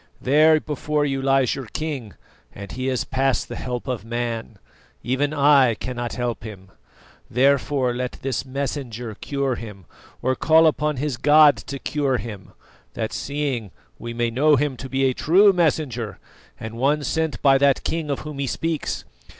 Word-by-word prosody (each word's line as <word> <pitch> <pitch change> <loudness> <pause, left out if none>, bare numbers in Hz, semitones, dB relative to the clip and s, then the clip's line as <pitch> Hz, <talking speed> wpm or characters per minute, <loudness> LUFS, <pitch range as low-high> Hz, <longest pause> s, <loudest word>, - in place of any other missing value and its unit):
There 155 +4 +5
before 150 0 -1
you 135 -1 -1
lies 135 -2 +2
your 135 -3 -6
king, 135 - -5 0.4
and 100 -1 -8
he 130 +4 -2
is 130 -2 0
past 135 0 0
the - - -5
help 125 +1 -5
of 125 -6 -3
man; 115 -1 -4 0.5
even 135 +4 0
I 140 -5 +4
cannot 120 +1 -5
help 120 -3 -3
him. 95 -3 -10 0.6
Therefore, 135 0 +2
let 125 0 -3
this 130 -2 -3
messenger 130 -4 -4
cure 140 +4 -2
him, 105 -6 -8 0.4
or 130 - +2
call 160 +3 +5
upon 150 -2 +1
his 140 -1 -2
God 150 +2 +6
to 140 - -7
cure 140 -2 -1
him; 105 -6 -8 0.4
that 110 - -3
seeing, 140 -7 -3 0.3
we 120 - -6
may 120 0 -1
know 145 +5 +4
him 145 0 0
to 130 - -7
be 135 +1 0
a 130 - +2
true 195 +9 +5
messenger, 145 - 0 0.4
and 110 +1 -7
one 145 +3 +2
sent 160 +3 -1
by 135 -1 +5
that 140 -1 +3
King 160 -2 -2
of 140 - -2
whom 150 -2 -7
he 140 - -1
speaks. 160 +4 -3
135 Hz, 165 wpm, -23 LUFS, 120-145 Hz, 0.6 s, God